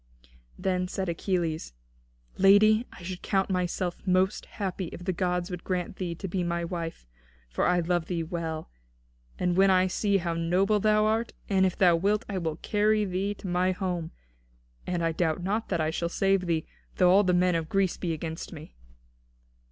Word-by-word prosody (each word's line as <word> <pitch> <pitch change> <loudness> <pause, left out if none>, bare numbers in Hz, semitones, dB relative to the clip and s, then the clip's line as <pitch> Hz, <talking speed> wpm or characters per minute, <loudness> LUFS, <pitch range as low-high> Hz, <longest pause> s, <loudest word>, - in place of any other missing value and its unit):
Then 185 -1 0
said 190 0 -3
Achilles: 170 - -2 0.7
"Lady, 215 +4 +6
I - - -13
should 185 +1 -6
count 195 -1 0
myself 180 -1 -1
most 185 +2 +1
happy 190 -2 -4
if 175 - -8
the 185 - 0
gods 180 0 -1
would 180 -1 -6
grant 180 0 -3
thee 175 -3 -3
to 190 - -6
be 180 0 -1
my 170 0 -1
wife. 165 - -5 0.5
For 60 - +1
I 180 0 +3
love 175 -1 0
thee 170 -2 -2
well, 160 -2 -4 0.7
when 180 +2 +3
I 185 -1 +4
see 200 +2 0
thee - - +6
how 170 -2 -2
noble 180 +5 +2
thou 215 +1 +3
art. 220 +2 0 0.2
And 190 -1 +4
if 185 - -4
thou 175 -3 +5
wilt, 205 +6 +1
I 195 -2 -2
will 160 -3 -2
carry 210 +4 +1
thee 195 +2 -2
to 195 - -8
my 180 +1 +1
home. 180 -4 -3 0.8
And 175 -2 -1
I 165 - +2
doubt 160 0 -1
not 210 +4 -1
that - - 0
I 155 0 +1
shall 170 +1 -2
save 195 0 +1
thee, 160 -2 0 0.3
though 180 -1 +5
all 200 +2 +6
the 180 -2 +2
men 180 0 +3
of 165 -1 -2
Greece 195 -2 +1
be 175 - -2
against 160 +1 -5
me." 155 -2 -10
180 Hz, 190 wpm, -28 LUFS, 170-195 Hz, 0.8 s, Lady